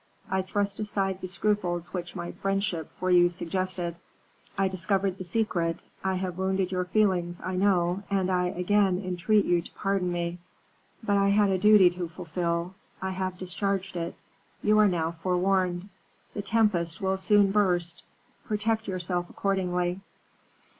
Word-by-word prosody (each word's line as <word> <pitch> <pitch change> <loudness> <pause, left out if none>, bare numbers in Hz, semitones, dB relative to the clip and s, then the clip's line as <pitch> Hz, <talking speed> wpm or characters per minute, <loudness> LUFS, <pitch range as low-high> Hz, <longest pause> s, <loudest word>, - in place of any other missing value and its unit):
I 190 0 +2
thrust 200 +1 -2
aside 195 -3 -1
the 185 - -4
scruples 180 -3 -1
which 175 -2 -5
my 175 -1 -4
friendship 195 -5 -2
for 185 0 0
you 175 0 +6
suggested. 175 0 -3 0.6
I 195 0 +3
discovered 190 +1 -1
the - - -4
secret. 175 -4 0 0.3
I 190 0 0
have 185 -1 -3
wounded 190 -1 0
your 180 -1 -1
feelings, 180 -4 +1
I 185 - -4
know, 185 -1 +2
and 190 -2 +1
I 180 -1 +2
again 185 +1 +2
entreat 185 +3 +1
you 175 -1 +2
to - - -12
pardon 195 -2 -1
me; 175 0 -2 0.6
but 205 -2 +2
I 200 0 +3
had 200 0 +4
a 190 - +1
duty 205 -3 +7
to 175 -1 -5
fulfil. 170 +1 -2 0.3
I 190 0 -3
have 185 -1 -3
discharged 195 +1 -2
it. 170 0 -3 0.5
You 215 0 +4
are 210 - +6
now 165 -3 0
forewarned; 180 +2 0 0.4
the 205 - -3
tempest 195 -6 +1
will 190 0 0
soon 200 0 +4
burst; 175 -4 +1 0.4
protect 220 +1 -1
yourself 180 -1 -2
accordingly." 180 -2 -1
185 Hz, 155 wpm, -27 LUFS, 175-195 Hz, 0.6 s, duty